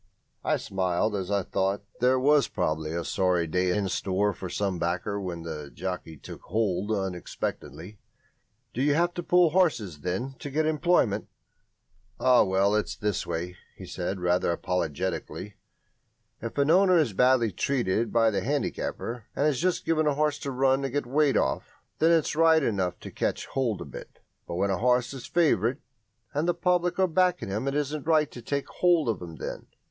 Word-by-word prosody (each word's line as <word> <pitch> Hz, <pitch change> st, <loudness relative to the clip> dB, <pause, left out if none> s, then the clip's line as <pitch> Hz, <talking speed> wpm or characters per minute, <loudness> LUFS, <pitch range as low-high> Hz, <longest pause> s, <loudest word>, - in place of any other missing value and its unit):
I -, -, +1 dB
smiled 95 Hz, +2 st, -1 dB
as 95 Hz, -2 st, -3 dB
I 100 Hz, -1 st, +1 dB
thought 95 Hz, +3 st, -1 dB, 0.2 s
there 130 Hz, +1 st, +3 dB
was 145 Hz, +2 st, +4 dB
probably 80 Hz, -4 st, -2 dB
a 85 Hz, -, -2 dB
sorry 90 Hz, -3 st, +1 dB
day 90 Hz, +3 st, 0 dB
in 100 Hz, +2 st, 0 dB
store 100 Hz, +2 st, 0 dB
for 95 Hz, -, -7 dB
some 95 Hz, -3 st, -2 dB
backer 90 Hz, +4 st, -2 dB
when 85 Hz, -3 st, -5 dB
the 75 Hz, -3 st, -6 dB
jockey 90 Hz, -4 st, -5 dB
"took -, -, -10 dB
hold" 105 Hz, 0 st, -1 dB
unexpectedly. 95 Hz, 0 st, -4 dB, 0.7 s
"Do 125 Hz, -, -2 dB
you 145 Hz, +1 st, +3 dB
have 175 Hz, +2 st, +2 dB
to 175 Hz, -, -4 dB
pull 175 Hz, -1 st, +4 dB
horses, 130 Hz, -, +1 dB
then, 95 Hz, -, -3 dB
to 145 Hz, -, -6 dB
get 155 Hz, +3 st, 0 dB
employment?" 155 Hz, -, +2 dB, 0.9 s
"Oh, 130 Hz, -1 st, +5 dB
well, 95 Hz, +1 st, +2 dB
it's 105 Hz, 0 st, 0 dB
this 105 Hz, -4 st, -2 dB
way," 85 Hz, +1 st, -4 dB, 0.2 s
he -, -, -10 dB
said, 90 Hz, +2 st, -4 dB
rather 90 Hz, 0 st, +1 dB
apologetically, 90 Hz, +3 st, -3 dB, 0.8 s
"if 115 Hz, +3 st, -6 dB
an 140 Hz, +2 st, +3 dB
owner 185 Hz, 0 st, +5 dB
is 145 Hz, -10 st, +2 dB
badly 125 Hz, +1 st, +3 dB
treated 115 Hz, 0 st, 0 dB
by 115 Hz, -1 st, +4 dB
the 100 Hz, -2 st, -1 dB
handicapper, 125 Hz, -3 st, -3 dB
and 145 Hz, -, +2 dB
is 140 Hz, -4 st, 0 dB
just 185 Hz, -1 st, 0 dB
giving 155 Hz, -1 st, +2 dB
his 145 Hz, -, +2 dB
horse 150 Hz, 0 st, 0 dB
a -, -, 0 dB
run 135 Hz, +1 st, +2 dB
to 135 Hz, -, -2 dB
get 145 Hz, 0 st, -2 dB
weight 140 Hz, +2 st, +2 dB
off, 65 Hz, -, -1 dB, 0.3 s
then 160 Hz, -, +4 dB
it's 165 Hz, -3 st, +2 dB
right 160 Hz, -1 st, +5 dB
enough 95 Hz, -7 st, -1 dB
to -, -, -8 dB
catch -, -, -2 dB
hold 120 Hz, -7 st, -2 dB
a -, -, -5 dB
bit. -, -, -11 dB, 0.3 s
But -, -, -4 dB
when 100 Hz, +3 st, +1 dB
a 95 Hz, -, -1 dB
horse 125 Hz, +1 st, +2 dB
is 135 Hz, -, -8 dB
favourite 140 Hz, -8 st, +2 dB, 0.6 s
and 150 Hz, +3 st, 0 dB
the 175 Hz, -, +2 dB
public 180 Hz, -1 st, +1 dB
are 190 Hz, -, +4 dB
backing 180 Hz, -, +1 dB
him 105 Hz, +7 st, -2 dB
it 140 Hz, -, -1 dB
isn't 150 Hz, 0 st, -2 dB
right 155 Hz, -2 st, +3 dB
to 120 Hz, -, -9 dB
take 140 Hz, +4 st, -2 dB
hold 175 Hz, -5 st, +2 dB
of 110 Hz, -6 st, -1 dB
him 85 Hz, -2 st, -8 dB
then. -, -, -6 dB
115 Hz, 185 wpm, -27 LUFS, 95-150 Hz, 0.9 s, Oh